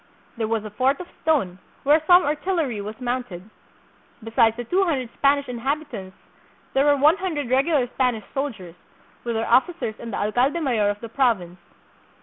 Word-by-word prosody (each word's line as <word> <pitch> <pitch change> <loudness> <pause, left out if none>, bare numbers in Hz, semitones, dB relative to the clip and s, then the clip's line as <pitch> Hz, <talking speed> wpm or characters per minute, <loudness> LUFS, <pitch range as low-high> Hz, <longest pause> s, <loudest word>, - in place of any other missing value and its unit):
There 225 -2 -2
was 220 -1 -1
a 215 - -7
fort 260 +6 +1
of 360 - -6 0.2
stone, 260 - 0 0.2
where 300 +3 +4
some 360 0 +7
artillery 295 - -1
was 215 +3 -7
mounted. 245 -7 -4 0.8
Be 225 - -8
sides 225 0 +3
the 240 - -4
two 365 - +1
hundred 270 -9 -1
Spanish 280 0 +2
inhabitants 250 -5 -4 0.6
there 270 +1 +3
were 290 -1 +4
one 300 +6 +5
hundred 310 -10 -3
regular 275 +1 +3
Spanish 245 -3 -1
soldiers, 230 -12 -4 0.5
with 235 -1 -3
their 225 +1 -1
officers 265 0 +2
and 235 - -7
the - - -3
alcalde 245 +10 +1
mayor 235 -9 +1
of 205 0 -4
the 230 - -7
province. 215 -9 0
255 Hz, 170 wpm, -23 LUFS, 220-290 Hz, 0.8 s, some